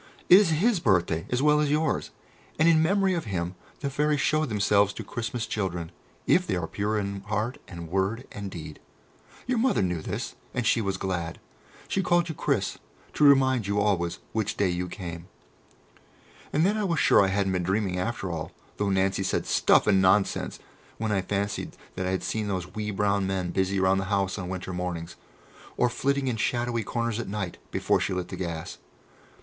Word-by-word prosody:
It 185 - +10
is 205 -5 +3
His 190 +6 +2
birthday 90 - +1
as 125 +2 0
well 150 0 +5
as 150 -1 +2
yours, 150 +1 0 0.5
and 160 - +4
in 160 -1 +6
memory 195 +3 +3
of 170 -6 -2
Him 90 -3 -2 0.3
the 140 - -1
Fairies 150 +1 +1
show 155 +3 +2
themselves 105 -3 +2
to - - -6
Christmas 115 0 -3
children, 90 -5 -3 0.3
if 180 0 +3
they - - 0
are 90 -2 -1
pure 105 +5 -1
in 100 -1 -3
heart 110 +4 -2
and 85 -2 -8
word 95 +8 -1
and 100 -1 -6
deed. 80 -4 -8 0.7
Your 250 -1 0
Mother 250 - +2
knew 90 -3 -1
this, - - -4 0.2
and 125 - -1
she 115 0 +3
was 100 -2 -1
glad. 90 -4 -3 0.5
She 195 - 0
called 175 -2 +2
you - - -2
'Chris' - - -1 0.3
to - - +1
remind 130 -6 +5
you 100 0 +1
always 95 -5 +1
which 110 -2 -2
day 100 -2 +2
you 90 +1 -2
came." 85 -1 -7 1.2
And 155 +3 +3
then 205 +3 +2
I 215 - 0
was 170 -5 0
sure - - +6
that - - +4
I 95 - -1
hadn't 100 -1 +1
been 90 -1 0
dreaming 95 0 0
after 95 -2 -2
all, 80 -1 -5 0.2
though 105 -1 0
Nancy 95 0 +1
said, 95 - 0
"Stuff - - +4
and 95 -3 +4
Nonsense," 95 +2 +2 0.4
when 110 -1 -2
I 100 -2 +2
fancied 100 +2 -3 0.2
that 95 0 -2
I - - 0
had 95 0 -1
seen 110 -1 -2
those 90 -2 -3
wee 105 0 -3
brown 100 -1 +1
men 95 -2 -1
busy 95 +1 0
about 95 0 +3
the 95 - -2
house 100 0 0
on 90 -1 -5
winter 95 0 -5
mornings, 90 -1 -4 0.6
or 125 - +3
flitting 140 +2 0
in 120 -3 0
shadowy 120 0 0
corners 115 +1 -2
at 120 - -4
night, 100 -4 -4
before - - +1
she 95 - -1
lit 90 -1 -3
the - - -5
gas. 85 -3 -5
100 Hz, 200 wpm, -27 LUFS, 95-125 Hz, 1.2 s, It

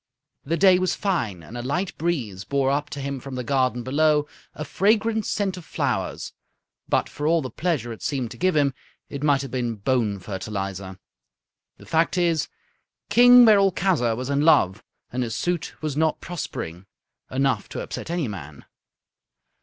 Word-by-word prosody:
The 165 +4 -1
day 185 -1 +6
was 185 0 0
fine, 120 - -2
and 115 - -11
a 120 - -4
light 175 +10 -2
breeze 125 - -2
bore 135 +1 +1
up 145 +1 -1
to 145 - -6
him 140 0 -4
from 135 +1 -8
the 125 - -3
garden 125 -1 0
below 150 +3 +2 0.3
a 150 - -5
fragrant 215 +4 +1
scent 195 -3 -1
of 180 - -9
flowers. - - -2 0.6
But, - - +2
for 150 - -4
all 165 -1 +3
the 130 - -5
pleasure 140 -7 -2
it 110 - -13
seemed 130 -5 -2
to - - -9
give 185 -1 +1
him, 140 -2 +3 0.4
it 140 - -6
might 145 -2 +2
have 135 - -7
been 120 -3 -2
bone 110 -1 0
fertilizer. 95 -1 -5 0.8
The - - -15
fact 165 +3 +1
is, 170 -4 +1 0.6
King 245 +2 +8
Merolchazzar 190 - +3
was 130 +3 -4
in 140 0 +2
love, 140 - +4 0.3
and 125 - -1
his 115 -2 -2
suit 175 +2 -2
was 150 -3 -2
not 160 +1 +1
prospering. 95 - -6 0.4
Enough 130 -5 0
to - - -5
upset - - -6
any 170 -5 -1
man. 75 -9 -8
140 Hz, 170 wpm, -24 LUFS, 120-170 Hz, 0.8 s, King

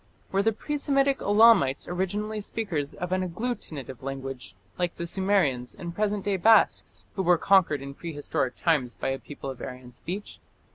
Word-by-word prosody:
Were 195 - +2
the 225 +2 +3
pre 295 +7 -4
Semitic 275 -1 +2
Elamites 205 - +5
originally 205 +4 -2
speakers 180 -10 -3
of 180 0 -5
an 185 0 +1
agglutinative 170 - -4
language, 135 -4 -5 0.2
like 175 -1 0
the 170 - -4
Sumerians 170 -10 +1
and 170 0 -6
present 205 0 -1
day 200 -2 +1
Basques, 220 +5 +3
who 195 - -2
were 175 -1 +4
conquered 165 -7 +3
in 140 0 -7
prehistoric 145 -5 -3
times 140 -8 +1
by - - -2
a 135 0 -2
people 140 -2 -7
of 130 - -11
Aryan 125 -1 -8
speech? 190 +11 -6
175 Hz, 165 wpm, -27 LUFS, 140-205 Hz, 0.2 s, Elamites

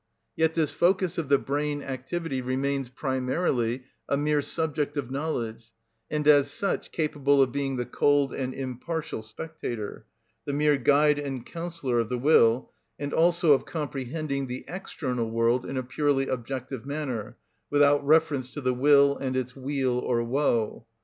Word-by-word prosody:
Yet 160 0 +2
this 160 -3 +1
focus 180 -1 +1
of 155 -4 -4
the 140 - +6
brain 145 +1 -2
activity 135 +2 -3
remains 135 +1 -1
primarily 130 -2 -1 0.3
a 140 - +2
mere 150 0 +2
subject 150 -1 -2
of 130 -3 -3
knowledge, 115 -6 -3 0.4
and 150 -1 -1
as 145 -1 +6
such 195 +7 -2
capable 145 -3 +1
of 130 -2 +4
being 135 0 -2
the 125 -1 -2
cold 145 +1 +2
and 130 -1 -3
impartial 135 +3 -4
spectator, 115 -2 -6 0.4
the 140 - -2
mere 150 0 +3
guide 145 +3 +4
and 135 -4 -4
counsellor 165 -8 -2
of 115 - -1
the 125 - -1
will, 120 -3 +4 0.3
and 145 0 -4
also 170 -1 +4
of 135 - 0
comprehending 140 -1 -3
the 125 +1 -6
external 130 -9 -3
world 115 +2 +1
in 135 - -4
a 130 - -1
purely 135 +1 0
objective 130 0 -4
manner, 140 -6 -4 0.3
without 145 0 +4
reference 145 -3 +3
to 145 - -4
the 130 -1 +1
will 140 +2 +5
and 130 -1 -2
its 125 -1 -3
weal 135 -2 -1
or 120 -2 0
woe. 115 -3 0
140 Hz, 155 wpm, -27 LUFS, 125-150 Hz, 0.4 s, the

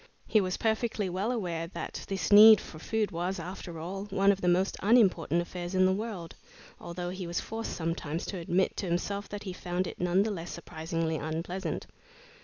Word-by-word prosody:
He 215 - +3
was 185 -1 -1
perfectly 220 -3 0
well 195 +6 -1
aware 175 -8 -2
that 170 - -6
this 190 -3 -2
need 215 +1 +10
for 155 - -10
food 220 +5 -1
was, 175 +3 -2
after 175 0 -7
all, 190 +5 -5
one 195 0 +3
of 195 -1 -2
the 180 - 0
most 185 +2 +2
unimportant 190 -6 +3
affairs 175 +1 -6
in 185 0 +5
the 190 - +4
world, 200 -5 -5 0.5
although 175 +1 -5
he 185 -1 -5
was 170 - -1
forced 225 +1 -5
sometimes 165 -1 -3
to 190 - -4
admit 175 +3 +1
to 195 - -2
himself 200 +4 -2
that 205 0 -6
he 190 -3 -5
found 180 0 -2
it - - -7
none 180 +2 +3
the 220 - -1
less 170 -3 -5
surprisingly 165 -1 -3
unpleasant. 165 +5 -3
185 Hz, 195 wpm, -30 LUFS, 170-200 Hz, 0.5 s, need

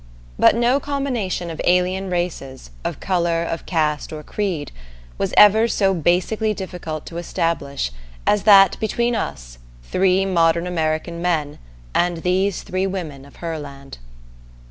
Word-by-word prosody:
But - - +6
no 240 +4 +3
combination 250 -12 -2
of 160 - -6
alien 185 +2 +1
races, 155 - -4
of - - -4
color, 170 -3 0
of 165 0 -5
caste, 155 -4 0
or 155 -1 -7
creed, 185 -5 -3 0.5
was - - -1
ever 215 +2 +7
so 195 -4 +2
basically 185 +6 +1
difficult 175 -5 -6
to 170 - -8
establish 145 - -2 0.3
as 210 - +3
that 195 -2 +6
between 235 +2 0
us, - - -5 0.2
three 190 - +2
modern 170 -2 +2
American 165 -1 -2
men, 160 -5 -1 0.3
and 175 -2 0
these 185 +1 0
three 185 +1 -1
women 160 -8 -5
of 140 - -17
Herland. 145 - -7
175 Hz, 135 wpm, -21 LUFS, 155-195 Hz, 0.5 s, ever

